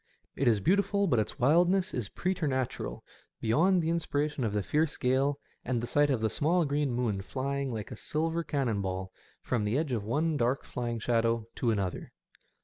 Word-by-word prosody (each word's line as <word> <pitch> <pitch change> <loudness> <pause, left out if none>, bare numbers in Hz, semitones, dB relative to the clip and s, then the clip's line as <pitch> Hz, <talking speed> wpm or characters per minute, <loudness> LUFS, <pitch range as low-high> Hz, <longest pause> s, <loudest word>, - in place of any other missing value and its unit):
It 135 - 0
is 110 -3 +4
beautiful, 200 +3 +2
but 130 - +2
its 110 +5 -2
wildness 175 +8 +3
is 115 -6 -3
preternatural, 140 - -2 0.4
beyond 165 +11 +3
the 160 - +1
inspiration 150 -4 -1
of 110 - 0
the 105 -1 -1
fierce 150 - 0
gale 135 +3 +1 0.3
and 120 -1 -1
the 115 - -3
sight 145 +4 +2
of 130 -5 +1
the 110 - +2
small 170 +3 +2
green 145 -1 0
moon 120 -5 -1
flying 135 +5 -3
like 110 -3 -5
a - - -5
silver 165 +2 -1
cannon 130 -10 -1
ball 95 0 -3 0.3
from 120 -4 0
the 105 +5 +1
edge 155 -2 -1
of 115 -4 -1
one 150 +8 0
dark 125 +2 +1
flying 120 -1 -3
shadow 115 0 +1
to 120 - -1
another. 100 -5 -2
130 Hz, 185 wpm, -30 LUFS, 115-155 Hz, 0.4 s, is